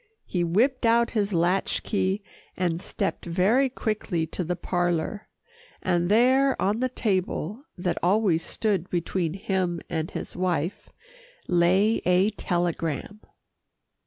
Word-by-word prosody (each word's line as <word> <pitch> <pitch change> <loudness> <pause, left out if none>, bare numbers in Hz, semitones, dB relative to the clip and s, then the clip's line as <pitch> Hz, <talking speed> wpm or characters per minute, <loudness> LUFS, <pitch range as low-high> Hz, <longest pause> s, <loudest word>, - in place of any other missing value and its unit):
He 175 -2 -1
whipped 235 +11 +2
out 235 0 +3
his 210 -2 0
latch 180 +2 +1
key, 200 -1 0 0.3
and 175 -2 0
stepped 195 0 -3
very 200 +10 +2
quickly 215 -8 -2
to 180 - -4
the 175 +2 -2
parlour, 175 +3 -1 0.5
and 175 -1 0
there 260 +5 +4
on 205 +4 +1
the 255 +1 0
table 205 - -2
that 180 0 -1
always 180 -3 +2
stood 195 -5 -1
between 175 -1 -1
him 190 -4 -1
and 160 -1 -1
his - - -6
wife, 180 0 -2 0.6
lay 185 +5 +3
a 180 +4 +3
telegram. 175 0 -2
185 Hz, 125 wpm, -26 LUFS, 175-215 Hz, 0.6 s, there